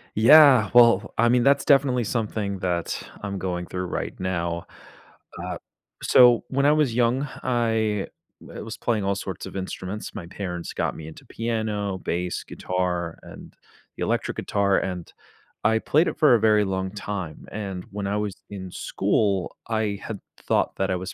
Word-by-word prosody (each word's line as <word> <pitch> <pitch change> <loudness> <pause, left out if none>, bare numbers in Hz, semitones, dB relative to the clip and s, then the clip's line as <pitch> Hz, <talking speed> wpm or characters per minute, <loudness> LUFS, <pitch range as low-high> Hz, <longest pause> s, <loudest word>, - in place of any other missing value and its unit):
Yeah, 130 -2 +7
well, 120 -1 +5
I 120 +1 +4
mean, 120 0 +3
that's 140 +1 +4
definitely 135 -3 +3
something 105 -3 -2
that 90 -2 -2 0.2
I'm 100 -1 -4
going 90 -2 -3
through 90 +1 -4
right - - -4
now. 85 -2 -2 0.8
Uh, - - -4 0.5
so 120 -2 +6
when 140 +1 +1
I 145 - +6
was 150 -6 +2
young, 125 +4 +2 0.2
I 110 -4 0 0.3
w - - -9
was 110 -1 -6
playing 110 -4 0
all 100 0 +1
sorts 95 -2 -6
of - - -9
instruments, 95 +2 -5
my 100 -6 -6
parents 90 -2 -5
got - - -1
me 80 - -8
into 80 - -12
piano, 110 -4 -2
bass, 90 0 -3
guitar, 90 -2 -3
and - - -12 0.4
the - - -3
electric - - -1
guitar, 100 -1 +1
and 90 -3 -4 0.5
I 110 0 +3
played 155 +8 +2
it - - -7
for 150 -5 +6
a - - +2
very 105 -1 +4
long 95 -1 -2
time, 100 -5 -6
and 95 -3 -5
when 100 0 -4
I 100 +1 -1
was 105 -2 -2
in 95 -2 -7
school, 100 -1 0
I 110 -3 -1
had 110 -3 -5 0.2
thought - - 0
that 95 0 0
I 95 - +1
was 95 +1 -6
105 Hz, 170 wpm, -24 LUFS, 95-115 Hz, 0.8 s, Yeah